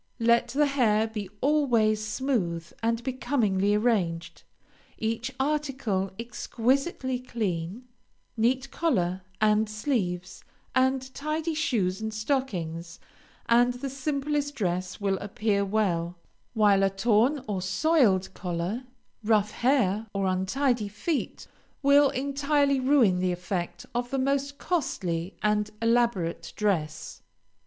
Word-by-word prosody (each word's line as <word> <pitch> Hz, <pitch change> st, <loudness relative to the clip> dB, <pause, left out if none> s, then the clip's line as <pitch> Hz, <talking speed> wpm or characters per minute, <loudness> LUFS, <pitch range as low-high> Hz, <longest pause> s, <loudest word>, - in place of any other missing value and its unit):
Let 235 Hz, 0 st, +3 dB
the 295 Hz, +3 st, +2 dB
hair 230 Hz, -6 st, +2 dB
be 215 Hz, -4 st, -5 dB
always 240 Hz, -7 st, +2 dB
smooth 215 Hz, -8 st, -1 dB, 0.2 s
and 230 Hz, +1 st, 0 dB
becomingly 230 Hz, -7 st, +1 dB
arranged, 185 Hz, -7 st, 0 dB, 0.6 s
each 225 Hz, +3 st, -2 dB
article 265 Hz, -9 st, -1 dB
exquisitely 255 Hz, +3 st, -1 dB
clean, 210 Hz, -4 st, -3 dB, 0.5 s
neat 255 Hz, +4 st, +1 dB
collar 190 Hz, -, 0 dB, 0.2 s
and 215 Hz, 0 st, +3 dB
sleeves, 210 Hz, -6 st, -2 dB, 0.3 s
and 260 Hz, 0 st, +1 dB
tidy 310 Hz, +3 st, -2 dB
shoes 220 Hz, -, 0 dB
and 220 Hz, 0 st, -3 dB
stockings, 180 Hz, -, -3 dB, 0.5 s
and 245 Hz, +1 st, +4 dB
the 265 Hz, +2 st, -5 dB
simplest 285 Hz, +1 st, -2 dB
dress 185 Hz, -3 st, -2 dB
will 195 Hz, -2 st, 0 dB
appear 205 Hz, 0 st, 0 dB
well, 180 Hz, -4 st, 0 dB, 0.4 s
while 205 Hz, -3 st, +4 dB
a 195 Hz, -, +4 dB
torn 230 Hz, +7 st, +2 dB
or 195 Hz, -3 st, -2 dB
soiled 195 Hz, -, +2 dB
collar, 180 Hz, +7 st, -3 dB, 0.4 s
rough 210 Hz, -1 st, +2 dB
hair, 225 Hz, -5 st, +1 dB
or 195 Hz, -1 st, 0 dB
untidy 210 Hz, +5 st, 0 dB
feet 240 Hz, -, -3 dB, 0.4 s
will 280 Hz, 0 st, +6 dB
entirely 280 Hz, +1 st, +1 dB
ruin 255 Hz, -9 st, +4 dB
the 185 Hz, 0 st, +1 dB
effect 175 Hz, -1 st, -4 dB
of 245 Hz, 0 st, -2 dB
the 270 Hz, -, -1 dB
most 275 Hz, +1 st, 0 dB
costly 185 Hz, -, -2 dB
and 210 Hz, 0 st, +1 dB
elaborate 230 Hz, -7 st, +1 dB
dress. 165 Hz, -8 st, -2 dB
225 Hz, 115 wpm, -27 LUFS, 195-270 Hz, 0.6 s, will